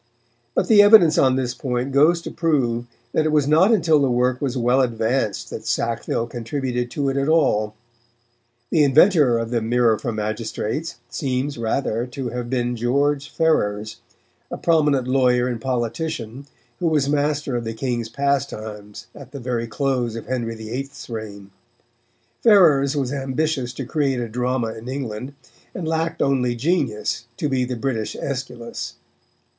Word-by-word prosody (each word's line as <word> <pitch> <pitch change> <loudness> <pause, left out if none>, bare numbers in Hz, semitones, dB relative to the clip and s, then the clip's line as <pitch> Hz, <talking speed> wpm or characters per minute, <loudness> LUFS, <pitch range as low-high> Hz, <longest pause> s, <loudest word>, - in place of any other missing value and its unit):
But - - +1
the 210 -2 +7
evidence 205 -6 +7
on 130 -1 +4
this 130 -2 -1
point 125 +1 -3
goes 160 +5 +4
to - - -6
prove 120 -8 0 0.2
that 155 0 +1
it - - 0
was 150 -2 +2
not 165 +8 +5
until 165 -8 +4
the 140 -2 +2
work 125 +1 +1
was 135 -2 -1
well 125 +2 +3
advanced 115 -5 -1
that 110 0 -7
Sackville 115 0 -1
contributed 120 +1 -3
to 140 +2 -2
it 135 - -2
at 140 +2 0
all. 110 -10 +2 1.0
The 155 - +4
inventor 145 - +5
of 115 0 -3
the 120 -2 0
Mirror 115 -1 +2
for 120 - -3
Magistrates 110 +7 -3
seems, 130 +1 -2
rather, 115 0 -1
to 125 0 -5
have 120 0 -5
been 120 -1 -1
George 140 +4 0
Ferrers, 110 -10 0 0.5
a - - -5
prominent 150 -6 +2
lawyer 125 -1 +3
and 120 -3 -3
politician, 125 +1 -3 0.3
who 175 - 0
was 150 -4 +2
master 145 -2 0
of 120 - -2
the 115 0 -5
King's 120 -2 -2
Pastimes 110 -7 -3
at 140 -4 -12
the 140 - -7
very 120 -2 -2
close 120 0 -1
of 115 - -6
Henry 120 -3 -3
VIII.'s 125 +5 -7
reign. 100 -3 -7 0.9
Ferrers 155 - +5
was 135 -1 -1
ambitious 135 -1 -1
to 130 +1 -5
create 135 -1 0
a 120 - -3
drama 125 0 -1
in 115 +3 -9
England, 130 0 -5 0.4
and 170 -3 -4
lacked 165 +1 -1
only 125 -3 +1
genius 120 -5 -1
to 150 - -1
be 130 -3 0
the 125 0 -4
British 115 -3 -3
Aeschylus. 125 -4 -5
130 Hz, 160 wpm, -22 LUFS, 115-140 Hz, 1.0 s, the